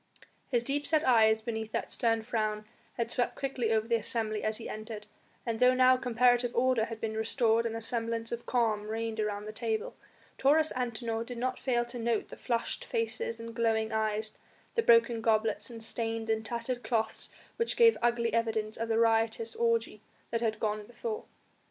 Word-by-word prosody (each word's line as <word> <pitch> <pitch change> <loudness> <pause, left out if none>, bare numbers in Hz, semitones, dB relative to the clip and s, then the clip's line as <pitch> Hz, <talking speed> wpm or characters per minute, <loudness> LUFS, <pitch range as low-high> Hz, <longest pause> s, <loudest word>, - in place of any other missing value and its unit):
His 240 -2 +1
deep 285 +3 -2
set 310 +1 +2
eyes 220 -3 +5
beneath 220 -1 -4
that - - -2
stern 225 -1 +1
frown 215 -2 -1 0.3
had 235 -1 -2
swept 245 - 0
quickly 255 -4 -1
over 220 0 +1
the 230 0 +3
assembly 220 -1 -2
as 215 0 0
he 230 - -7
entered, 215 -1 -7 0.4
and 230 -2 -2
though 250 0 +5
now 255 0 +6
comparative 245 -1 +2
order 245 -2 +3
had 225 -1 -7
been 220 -1 -3
restored 225 +1 +2
and 225 - -4
a 225 - -4
semblance 230 0 -2
of 235 0 -5
calm 220 -4 +1
reigned 225 0 -3
around 210 -1 -2
the 215 - -5
table, 220 -1 -2 0.4
Taurus 310 +3 +4
Antinor 235 -2 -2
did 245 +1 -7
not 255 +2 -2
fail 240 -2 +1
to 240 0 -7
note 230 -1 0
the - - -8
flushed 235 -2 -2
faces 230 0 -2
and 230 0 -7
glowing 225 -1 +1
eyes, 215 0 -1 0.4
the 460 - +2
broken 460 - +4
goblets, 220 +2 +1
and 230 -2 -8
stained 225 0 -3
and 220 0 0
tattered 235 +2 -3
cloths 220 -2 -1 0.3
which 465 - -1
gave 460 -1 +7
ugly 235 -1 +1
evidence 220 -2 0
of 230 0 -3
the 225 - +2
riotous 225 0 +2
orgy 230 -2 0 0.3
that 230 0 0
had 220 -2 0
gone 210 -1 -2
before. 440 - -5
230 Hz, 185 wpm, -30 LUFS, 220-240 Hz, 0.4 s, gave